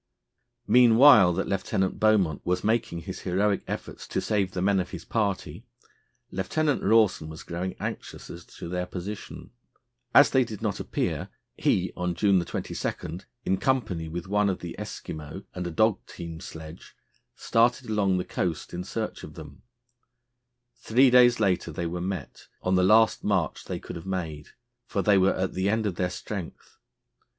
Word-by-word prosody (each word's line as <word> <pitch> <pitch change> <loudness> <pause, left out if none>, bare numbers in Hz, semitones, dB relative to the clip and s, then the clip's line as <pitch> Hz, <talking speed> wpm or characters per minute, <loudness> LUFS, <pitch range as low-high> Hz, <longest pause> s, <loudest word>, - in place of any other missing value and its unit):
Meanwhile 120 -5 +7
that 95 - -2
Lieutenant 95 0 -1
Beaumont 100 -8 +2
was 90 0 -1
making 110 -6 0
his 95 +3 -7
heroic 100 +2 +1
efforts - - -6
to - - -1
save 100 -3 0
the 90 - -2
men 100 0 +3
of 90 -1 -3
his 90 -2 -8
party, 100 -4 -2 0.7
Lieutenant 145 +10 0
Rawson 105 -7 +3
was 80 0 -9
growing 90 +2 -4
anxious - - -6
as - - -9
to - - -10
their 90 +1 -3
position. 100 -6 -7 0.6
As - - +7
they 130 - +4
did 110 -4 -7
not 105 -4 -2
appear, - - -2 0.3
he, 90 0 +1
on 90 -1 -2
June 95 -3 +3
22, 85 0 -4 0.3
in 95 - +1
company 100 -8 0
with 85 +1 -5
one 105 +1 +2
of 95 - -1
the 85 -1 -6
Eskimo 80 +5 -7
and 90 -1 -4
a - - -3
dog 110 +4 +2
team 85 -2 -8
sledge, 80 -2 -10 0.4
started 120 +2 +2
along 100 -4 +1
the 90 - -2
coast 85 -4 -3
in 90 +1 -4
search 110 +3 -4
of 75 - -10
them. 75 -4 -11 1.2
Three 125 +3 +4
days 120 -1 +6
later 90 -3 +1
they 85 +2 -4
were 85 +1 -3
met 95 0 -5 0.2
on 90 - +1
the 90 - +4
last 110 +4 +4
march 95 -6 0
they - - -4
could - - -8
have 85 +3 -10
made, 80 -6 -4 0.4
for 100 - -1
they 100 -2 +5
were 95 +1 +3
at 95 0 -2
the 95 +2 0
end 110 +1 +1
of 100 - 0
their 90 -1 0
strength. 95 -1 -7
95 Hz, 170 wpm, -26 LUFS, 90-105 Hz, 1.2 s, Meanwhile